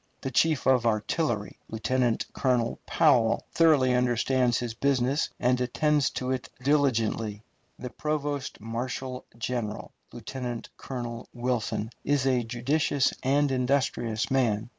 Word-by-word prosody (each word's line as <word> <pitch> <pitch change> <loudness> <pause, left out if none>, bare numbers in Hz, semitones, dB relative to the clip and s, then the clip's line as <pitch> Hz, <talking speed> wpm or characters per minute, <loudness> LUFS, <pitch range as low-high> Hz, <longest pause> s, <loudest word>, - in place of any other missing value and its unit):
The 135 - -3
chief 155 +3 +2
of 125 -3 +4
artillery, 110 - -1
Lieutenant 120 +2 0
Colonel 125 -3 0
Powell, 115 -3 +3
thoroughly 150 -6 +4
understands 125 0 +2
his 120 -2 -3
business, 135 +2 +1
and 125 0 +2
attends 145 +3 +2
to 130 0 -2
it 130 -2 -3
diligently. 115 -7 +1 0.3
The 125 - -7
provost 145 -2 -3
marshal 125 +3 -4
general, 115 -2 -3 0.2
Lieutenant 120 0 -6
Colonel 120 -3 -6
Wilson, 120 -3 -2
is 145 -2 +1
a 130 -2 +3
judicious 135 +4 +1
and 140 +2 +2
industrious 125 -4 0
man. 115 -4 +1
125 Hz, 120 wpm, -27 LUFS, 115-135 Hz, 0.3 s, of